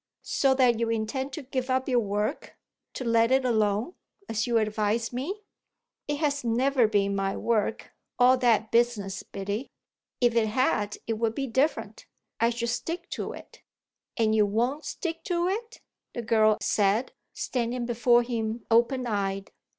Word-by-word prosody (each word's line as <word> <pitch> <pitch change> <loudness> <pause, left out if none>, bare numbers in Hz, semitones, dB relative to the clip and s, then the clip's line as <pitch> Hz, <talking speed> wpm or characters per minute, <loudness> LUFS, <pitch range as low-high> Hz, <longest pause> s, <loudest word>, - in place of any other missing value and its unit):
"So 270 -1 +2
that 245 -3 +3
you 230 -1 0
intend 230 +5 -2
to 310 - -5
give 260 0 -3
up 260 0 +1
your 250 -3 +3
work 210 +4 -3 0.4
to - - -4
let 230 +1 +3
it 265 0 +3
alone, 220 - +1 0.3
as 220 +1 -1
you 235 -1 +2
advise 215 +2 0
me?" 360 +13 -4 0.6
"It 295 - -1
has 285 -2 0
never 245 +1 +2
been 200 -2 +1
my 195 0 -1
work, 225 -2 -1 0.3
all 250 +1 +6
that 225 -3 +2
business, 230 -5 +1
Biddy. 200 +6 -5 0.5
If 240 -2 +3
it 230 -2 +2
had 210 -3 0
it 225 -1 -2
would 225 -1 0
be 275 - -1
different. 265 +5 -1 0.3
I 230 - +3
should 235 0 -2
stick 335 +8 -4
to - - -4
it." - - -13 0.6
"And 220 -2 +2
you 210 -1 +4
won't 245 +9 -1
stick 330 -2 -4
to 345 -1 0
it?" 450 +5 -4 0.3
the 240 - -3
girl 215 -1 +3
said, 210 +4 +1 0.2
standing 245 -1 -2
before 240 0 +3
him 230 -1 -3
open 245 +3 +3
eyed. 195 -3 -2
235 Hz, 160 wpm, -27 LUFS, 215-260 Hz, 0.6 s, all